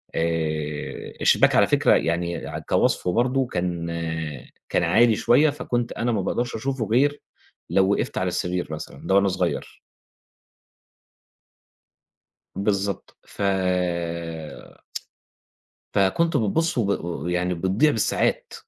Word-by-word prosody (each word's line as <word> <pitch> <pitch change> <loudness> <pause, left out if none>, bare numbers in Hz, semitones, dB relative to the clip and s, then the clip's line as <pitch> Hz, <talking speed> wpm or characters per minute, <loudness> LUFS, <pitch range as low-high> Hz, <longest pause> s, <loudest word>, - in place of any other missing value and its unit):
آآ 80 -2 -2
الشباك - - +4
على - - +5
فكرة - - +4
يعني 85 0 -1 0.3
كوصفه 90 - +2
برضه 130 +4 +2
كان 85 -3 -2 0.8
كان - - +1
عالي 120 -2 +4
شوية 145 +8 +4
فكنت 120 -4 -2
أنا 120 +1 -1
ما 105 -4 0
باقدرش 120 +6 -2
أشوفه 130 0 -2
غير 140 +7 +2 0.5
لو 95 0 +3
وقفّت - - -1
على 90 - 0
السرير 90 0 -2
مثلًا 75 - -8
ده 95 - +3
وأنا 100 0 +4
صغير. 95 -1 -2 2.8
بالضبط 100 -1 -2
ف - - -11 2.5
فكنت 100 - +2
بتبُصّ 160 - 0
وب 110 -5 +1 0.2
و 85 -2 -4
يعني 90 +1 0
بتضيع 95 - +2
بالساعات 110 -6 0
100 Hz, 110 wpm, -24 LUFS, 90-120 Hz, 2.8 s, على